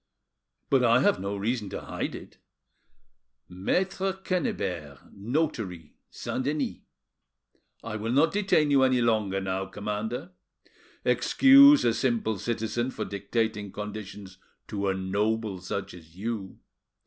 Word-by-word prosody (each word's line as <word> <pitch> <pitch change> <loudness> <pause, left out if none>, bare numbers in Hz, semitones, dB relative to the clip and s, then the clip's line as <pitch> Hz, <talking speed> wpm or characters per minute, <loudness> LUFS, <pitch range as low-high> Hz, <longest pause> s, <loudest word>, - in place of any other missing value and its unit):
But 135 -2 +4
I 120 +1 +5
have - - +3
no 100 +1 -3
reason 105 0 -2
to - - -5
hide - - -4
it: - - -12 1.1
Maitre 185 - -1
Quennebert, 95 - -3
notary, 105 - -3 0.2
Saint 130 - -4
Denis. 145 +1 -1 1.1
I 115 -1 -4
will 110 +2 -3
not 145 +6 +3
detain 190 -7 +2
you 140 -1 +5
any 130 -1 +4
longer 110 -5 +1
now, 95 0 -2
commander; 105 - -4 0.7
excuse 280 +1 +7
a 115 - +3
simple 115 -5 0
citizen 115 +3 -2
for - - -4
dictating 105 +1 -2
conditions 105 -2 -8 0.3
to 100 -1 -2
a 95 - +1
noble 100 +2 -1
such 100 +2 -4
as 80 -2 -15
you. 100 -1 -5
110 Hz, 125 wpm, -27 LUFS, 100-130 Hz, 1.1 s, excuse